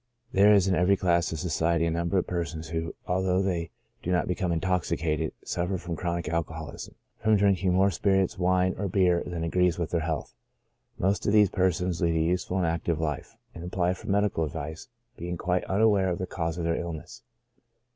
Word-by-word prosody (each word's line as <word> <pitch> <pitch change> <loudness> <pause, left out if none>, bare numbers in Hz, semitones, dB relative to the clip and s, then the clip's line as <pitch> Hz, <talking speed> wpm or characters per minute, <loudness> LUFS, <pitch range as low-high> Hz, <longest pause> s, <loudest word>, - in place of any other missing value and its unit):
There 100 +2 +6
is 100 -2 +5
in 95 - +2
every 90 +2 +3
class 85 -2 +2
of 80 - -3
society 85 0 +1
a 85 - +1
number 85 +3 0
of 90 - +1
persons 85 -2 -4
who, 80 -1 -3
although 95 +1 +1
they 85 -4 -1 0.3
do 90 - -3
not 90 - +1
become 90 -1 -1
intoxicated, 80 -2 0
suffer 90 +2 -1
from 85 -1 -5
chronic 85 0 -2
alcoholism 80 -2 -4 0.3
from 110 0 +4
drinking 95 -2 +2
more 95 +1 +4
spirits, 95 0 +1
wine, 90 +1 +2
or 100 - -1
beer 90 -2 +3
than 85 -2 -4
agrees 90 0 +2
with 85 -2 -3
their 85 - +1
health. 80 -2 -3 0.6
Most 95 +3 0
of 105 - +2
these 105 -2 +5
persons 90 -2 0
lead 85 -1 +2
a - - +2
useful 90 +3 0
and 90 - +1
active 85 -1 -1
life, 75 -3 -3 0.2
and 85 - -8
apply 90 0 0
for 95 - -9
medical 100 -4 +1
advice, 80 - -5 0.3
being 85 +1 -4
quite 90 +2 0
unaware 100 -1 +3
of 85 - -1
the 95 - -3
cause 85 -2 -3
of 85 - -3
their 85 0 0
illness. 85 -1 -7
90 Hz, 195 wpm, -27 LUFS, 85-95 Hz, 0.6 s, There